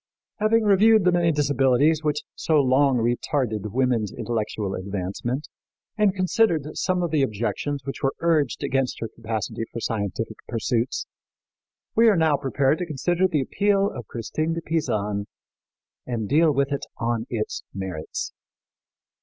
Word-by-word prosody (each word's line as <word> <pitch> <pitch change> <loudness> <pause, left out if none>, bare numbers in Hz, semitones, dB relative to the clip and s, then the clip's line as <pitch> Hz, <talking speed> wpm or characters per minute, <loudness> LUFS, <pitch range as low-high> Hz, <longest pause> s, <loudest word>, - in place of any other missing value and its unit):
Having 220 +2 +3
reviewed 215 +1 +5
the 180 - +4
many 175 -1 +3
disabilities 145 +1 +3
which 150 -1 -1
so 160 - 0
long 135 -1 +4
retarded 120 -2 -1
woman's 120 -4 +1
intellectual 105 -3 -3
advancement, 100 +9 -3 0.5
and 210 -3 +2
considered 185 -3 +2
some 180 -1 0
of 170 - -1
the 155 -3 +2
objections 135 +4 -1
which 135 - -5
were 135 - 0
urged 155 -7 +1
against 135 -1 0
her 115 - -3
capacity 110 0 -4
for 115 - -5
scientific 100 -6 -3
pursuits, 120 +1 -1 0.9
we 230 +1 +6
are 205 - +3
now 160 -2 +4
prepared 135 +2 +1
to 180 - -3
consider 175 +5 +1
the 155 -6 0
appeal 200 +7 +1
of - - -8
Christine 155 +8 -2
de 165 - -3
Pisan 105 -11 -1 0.8
and 115 -4 -2
deal 155 +5 +4
with 140 0 0
it 140 - -3
on 115 0 -1
its 110 -3 -3
merits. 95 -5 -5
135 Hz, 145 wpm, -24 LUFS, 115-165 Hz, 0.9 s, we